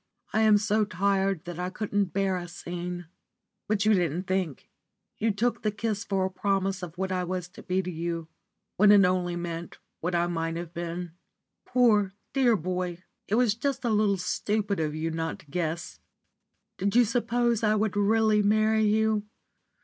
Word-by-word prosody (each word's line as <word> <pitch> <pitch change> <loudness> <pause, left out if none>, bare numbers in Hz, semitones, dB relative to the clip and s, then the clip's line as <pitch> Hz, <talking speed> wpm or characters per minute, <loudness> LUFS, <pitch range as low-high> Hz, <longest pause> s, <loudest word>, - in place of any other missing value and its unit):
I 220 - +3
am 215 -1 +6
so 215 +1 +2
tired 195 -2 0
that 175 -1 -6
I 180 0 -2
couldn't 205 +1 -1
bear 195 +1 0
a 175 -1 -4
scene. 175 +1 -6 0.6
But 210 -1 +1
you 215 - +5
didn't 175 -2 +1
think. 185 -7 -2 0.5
You 225 - +2
took 225 +4 0
the 215 - +1
kiss 210 0 -2
for 195 -2 0
a 190 - -2
promise 195 0 0
of 175 -1 -7
what 190 0 -2
I 185 -1 0
was 180 -1 -3
to 190 - -13
be 185 +1 -1
to 180 - -4
you, 165 0 -3 0.5
when 205 +1 +7
it 200 -2 +7
only 180 -1 0
meant 170 -1 -5 0.2
what 175 +2 -2
I 170 0 +2
might 165 -1 -2
have 170 0 -6
been. 175 0 -4 0.5
Poor, 210 -6 +3 0.2
dear 255 -4 +4
boy! 180 0 -3 0.2
it 210 - +1
was 240 -3 +3
just 265 +3 -2
a 235 - +2
little 210 -2 +3
stupid 200 +2 -1
of 155 -1 -1
you 160 +1 -2
not 165 0 -3
to - - -19
guess. 165 0 -3 0.8
Did 200 +2 0
you 245 0 +6
suppose 235 0 +1
I 215 -1 +3
would 215 -1 0
really 215 +1 +3
marry 215 +1 +3
you? 215 0 +2
195 Hz, 180 wpm, -27 LUFS, 175-215 Hz, 0.8 s, when